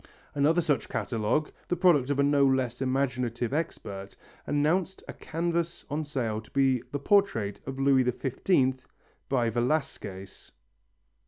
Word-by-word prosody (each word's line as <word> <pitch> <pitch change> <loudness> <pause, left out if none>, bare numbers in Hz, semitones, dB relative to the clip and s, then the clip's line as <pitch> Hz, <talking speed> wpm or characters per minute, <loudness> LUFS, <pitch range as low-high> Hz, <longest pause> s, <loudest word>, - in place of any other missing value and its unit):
Another 155 +5 +3
such 145 -7 0
catalogue, 120 +6 -1 0.2
the 180 - 0
product 165 -7 +4
of 140 -1 0
a - - +5
no 140 0 +3
less 130 -2 +1
imaginative 125 -2 -1
expert, 100 -10 -4 0.3
announced 165 +6 0
a - - -6
canvas 170 +1 -3
on 155 +2 -1
sale 120 -7 -2
to 110 - -19
be 135 -3 +2
the 145 - -1
portrait 140 - +1
of 135 0 -5
Louis 135 -1 +4
XV 130 +1 0 0.4
by 120 -4 +1
Velasquez! 120 -7 -3
135 Hz, 135 wpm, -28 LUFS, 120-155 Hz, 0.4 s, a